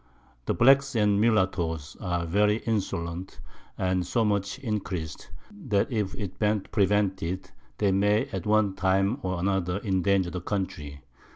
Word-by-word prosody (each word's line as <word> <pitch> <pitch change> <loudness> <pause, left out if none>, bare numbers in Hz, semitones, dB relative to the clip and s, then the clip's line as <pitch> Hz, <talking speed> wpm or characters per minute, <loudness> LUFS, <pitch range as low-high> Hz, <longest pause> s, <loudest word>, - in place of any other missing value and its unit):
The - - +1
Blacks 135 +2 +5
and 105 -2 +3
Mullattoes 90 -8 0
are 85 -4 -1
very 105 +5 +2
insolent, 95 -5 -3 0.4
and 95 -1 0
so 115 +6 0
much 100 -2 0
increas'd, 95 - -4 0.2
that 130 - -1
if 105 -5 -1
it 95 -3 -6
ben't 105 -2 0
prevented, 95 -3 0 0.3
they 100 -2 +2
may 105 +2 +2
at - - -4
one 105 -2 +3
time 95 +6 +1
or 95 -3 -2
other 95 -1 0
endanger 95 -2 +1
the 90 - -4
Country. 80 -8 -4
100 Hz, 135 wpm, -27 LUFS, 90-105 Hz, 0.4 s, Blacks